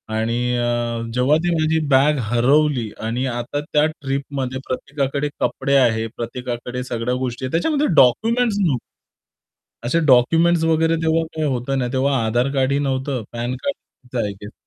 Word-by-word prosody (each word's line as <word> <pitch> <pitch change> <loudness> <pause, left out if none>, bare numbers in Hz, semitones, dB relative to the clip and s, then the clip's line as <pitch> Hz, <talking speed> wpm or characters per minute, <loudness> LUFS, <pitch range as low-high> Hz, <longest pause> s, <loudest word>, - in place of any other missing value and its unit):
आणि 115 +1 0 0.2
अ, 120 -1 -1
जेव्हा 130 +4 +3
ती 175 - +1
माझी 160 0 +1
बॅग 140 +2 +4
हरवली 130 0 +2 0.2
आणि 125 +3 -1
आता 120 +4 -3
त्या 150 0 +4
ट्रिपमध्ये 135 -3 -4
प्रत्येकाकडे 140 +2 -2
कपडे 140 - 0
आहेत, 115 -3 +2
प्रत्येकाकडे 125 +1 -5
सगळ्या 120 0 -2
गोष्टी 130 0 -3
आहेत 130 - -5
त्याच्यामध्ये 295 - +1
डॉक्युमेंट्स 225 - +3
नव्हते. 150 -11 +1 1.1
असे 165 +7 +2
डॉक्युमेंट्स 165 +6 +4
वगैरे 165 0 +2
तेव्हा 165 0 +2
काही 155 -1 -1
होतं 130 +1 -1
नाही 125 -1 -2
तेव्हा 135 +1 +1
आधार 120 +4 +1
कार्डही 140 +1 +1
नव्हतं, 135 -3 -2
पॅन 120 +2 -3
कार्ड 280 - -3 0.3
होतं 125 -1 -3
आय 105 - -3
गेस. 105 - -8
130 Hz, 150 wpm, -20 LUFS, 120-150 Hz, 1.1 s, बॅग